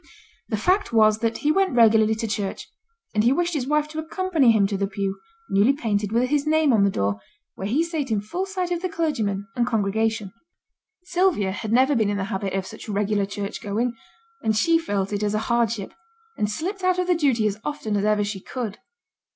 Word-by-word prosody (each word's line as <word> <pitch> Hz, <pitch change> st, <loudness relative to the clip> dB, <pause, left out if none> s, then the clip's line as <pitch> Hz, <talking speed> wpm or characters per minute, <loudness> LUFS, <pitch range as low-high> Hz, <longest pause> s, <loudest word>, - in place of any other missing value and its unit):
The 215 Hz, -, 0 dB
fact 370 Hz, -, +1 dB
was 215 Hz, -2 st, +4 dB
that 230 Hz, 0 st, 0 dB
he 300 Hz, -, +5 dB
went 385 Hz, -4 st, +1 dB
regularly 220 Hz, -2 st, +5 dB
to 225 Hz, +1 st, -3 dB
church, 205 Hz, -2 st, -3 dB, 0.5 s
and 210 Hz, -, +2 dB
he 240 Hz, -, +4 dB
wished 345 Hz, +4 st, +1 dB
his 270 Hz, -5 st, -2 dB
wife 300 Hz, +1 st, +1 dB
to 310 Hz, +1 st, -5 dB
accompany 320 Hz, -4 st, +1 dB
him 215 Hz, -3 st, +3 dB
to 200 Hz, 0 st, -1 dB
the 195 Hz, 0 st, 0 dB
pew, 195 Hz, -1 st, -3 dB, 0.3 s
newly 205 Hz, +8 st, +3 dB
painted, 210 Hz, -6 st, -1 dB
with 245 Hz, +3 st, +1 dB
his 295 Hz, 0 st, +1 dB
name 310 Hz, -3 st, +3 dB
on 210 Hz, -3 st, +4 dB
the 200 Hz, -, +4 dB
door, 100 Hz, -, -1 dB, 0.3 s
where 195 Hz, -, -5 dB
he 275 Hz, +10 st, +2 dB
sate 320 Hz, -5 st, -3 dB
in 215 Hz, -2 st, +1 dB
full 350 Hz, -, -4 dB
sight 370 Hz, -2 st, -3 dB
of 345 Hz, -1 st, -1 dB
the 370 Hz, -, -2 dB
clergyman 220 Hz, -, -1 dB
and 245 Hz, 0 st, +1 dB
congregation. 220 Hz, -1 st, 0 dB, 0.7 s
Sylvia 350 Hz, -, +1 dB
had 215 Hz, +2 st, -5 dB
never 260 Hz, +4 st, +4 dB
been 220 Hz, -4 st, +2 dB
in 205 Hz, -, -1 dB
the 195 Hz, -, -1 dB
habit 195 Hz, 0 st, -2 dB
of 190 Hz, -1 st, -1 dB
such 215 Hz, -, -10 dB
regular 205 Hz, 0 st, 0 dB
church 200 Hz, 0 st, -5 dB
going, 225 Hz, +4 st, -1 dB, 0.5 s
and 220 Hz, -1 st, +1 dB
she 330 Hz, +8 st, +4 dB
felt 205 Hz, -10 st, -2 dB
it 205 Hz, -, -1 dB
as 210 Hz, 0 st, 0 dB
a 220 Hz, +2 st, -2 dB
hardship, 230 Hz, -4 st, 0 dB, 0.4 s
and 210 Hz, -, -1 dB
slipped 370 Hz, -, -4 dB
out 365 Hz, 0 st, +2 dB
of 365 Hz, -, +1 dB
the 360 Hz, -, +3 dB
duty 270 Hz, -9 st, +2 dB
as 210 Hz, 0 st, -1 dB
often 260 Hz, -8 st, -3 dB
as 200 Hz, -, 0 dB
ever 210 Hz, 0 st, +2 dB
she 205 Hz, -1 st, -4 dB
could. 220 Hz, 0 st, -5 dB
225 Hz, 215 wpm, -24 LUFS, 205-300 Hz, 0.7 s, he